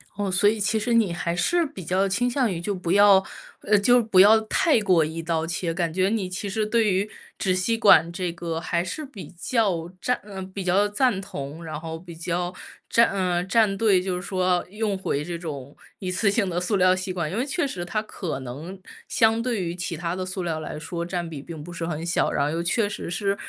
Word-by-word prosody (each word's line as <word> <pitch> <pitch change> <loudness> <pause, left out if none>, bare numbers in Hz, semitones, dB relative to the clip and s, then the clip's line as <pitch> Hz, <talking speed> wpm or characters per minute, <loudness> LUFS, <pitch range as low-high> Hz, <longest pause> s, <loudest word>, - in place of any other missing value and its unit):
哦， 200 -1 -2
所 185 +3 +3
以 220 0 -1
其 215 +2 +1
实 235 +3 -1
你 225 -6 +3
还 170 0 -2
是 345 - +2
比 280 - -8
较 185 +4 +1
倾 240 +6 +1
向 245 -3 +1
于 170 -2 -4
就 205 +2 -2
不 180 -2 -3
要， 200 0 +6 0.4
呃， 210 0 +3
就 245 +4 +5
不 215 -5 +2
要 215 +3 +8
太 235 +5 +2
过 185 -5 +4
一 160 +2 -4
刀 165 -1 -1
切， 165 0 -2
感 170 -2 -1
觉 185 +3 +1
你 210 -4 -1
其 185 +3 -4
实 215 +2 -1
对 220 -1 +2
于 195 +3 0 0.3
纸 185 -2 +1
吸 195 +5 0
管 170 -7 +6
这 180 -1 -3
个 170 -1 -4
还 170 0 -1
是 305 +11 -5
比 240 -9 -10
较 180 -3 -1
站 250 - 0
嗯， 190 -2 -8
比 195 0 -5
较 190 +3 +3
赞 220 -1 +1
同， 165 -5 -7
然 155 -2 -5
后 160 0 -6
比 170 0 -11
较 175 +2 -2 0.4
站 235 0 +5
呃， 180 -3 0
站 200 +1 +2
队， 195 -3 +3
就 185 0 -2
是 180 - -4
说 185 -2 0
用 210 -1 -2
回 150 -6 -2
这 175 -1 -4
种 145 -5 -7 0.2
一 185 -1 -4
次 200 +3 +2
性 200 -1 +1
的 175 0 -1
塑 205 +3 0
料 185 -1 +4
吸 185 0 -4
管， 170 -3 -3
因 - - -4
为 245 - +1
确 295 +3 -1
实 185 -10 -4
它 210 +5 -2
可 175 -9 -5
能 150 +10 -8 0.3
相 225 0 +3
对 235 -5 -1
于 170 0 -3
其 180 -2 -4
他 170 +1 -3
的 185 - -3
塑 185 0 -4
料 160 -2 -2
来 155 - -6
说， 170 +2 -4
占 175 -1 -3
比 155 -4 -7
并 155 0 -8
不 175 +2 -9
是 165 -1 -4
很 160 0 -4
小。 175 - +1
然 140 - +1
后 150 - -1
又 165 +2 -1
确 205 +5 +1
实 205 - -6
是 195 +2 0
185 Hz, 255 characters per minute, -24 LUFS, 170-210 Hz, 0.4 s, 要